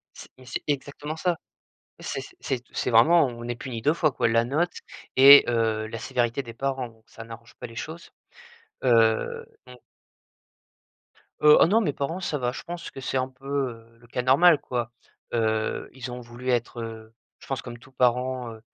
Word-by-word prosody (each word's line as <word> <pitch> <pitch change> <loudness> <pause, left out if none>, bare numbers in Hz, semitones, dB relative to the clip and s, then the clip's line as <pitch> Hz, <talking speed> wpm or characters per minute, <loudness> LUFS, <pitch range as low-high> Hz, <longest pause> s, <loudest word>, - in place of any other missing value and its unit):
C'est - - -12
mais 130 - -16
c'est 125 - -4
exactement 145 +2 -3
ça. 175 +1 0 0.6
C'est - - -4 0.2
c'est 125 -3 -3
c'est - - -1
vraiment, 140 +6 +5
heu - - -9
on 120 0 -8
est 120 - -2
puni 120 -1 -7
2 150 - +3
fois 155 -3 +2
quoi, - - +1
la 115 +1 +3
note 155 +8 0 0.4
et 140 +2 +10
heu, 110 -2 0
la 115 - -6
sévérité 120 +3 -1
des 115 -3 -10
parents. 135 0 -2
Donc 110 -1 -23
ça 115 - -11
n'arrange 115 0 -12
pas - - -5
les 115 -1 -14
choses, 160 +6 -7 0.7
heu, 115 -3 +2 0.2
on 125 0 -12 1.7
Heu, 150 0 +8
oh - - +6
non 210 +6 +3
mes 150 -10 -1
parents 160 +6 -3
ça 160 -4 -2
va, 125 -2 -1
je - - -7
pense 175 0 -7
que 135 - -9
c'est 135 - -3
un 130 0 0
peu, 130 +1 -18 0.2
heu, 115 0 -15
le 120 - -19
cas 120 - -3
normal, 145 +5 +5
quoi, 120 -2 -4 0.4
heu, 110 -2 -1
ils 125 -1 -7
ont 125 - -6
voulu 120 +1 -9
être, 120 -1 -1
heu, 110 0 -9 0.2
je - - -16
pense 135 -3 -3
comme 120 -1 -9
tout 130 +3 -19
parent, 125 0 0
heu 110 - -12
125 Hz, 200 wpm, -25 LUFS, 115-140 Hz, 1.7 s, et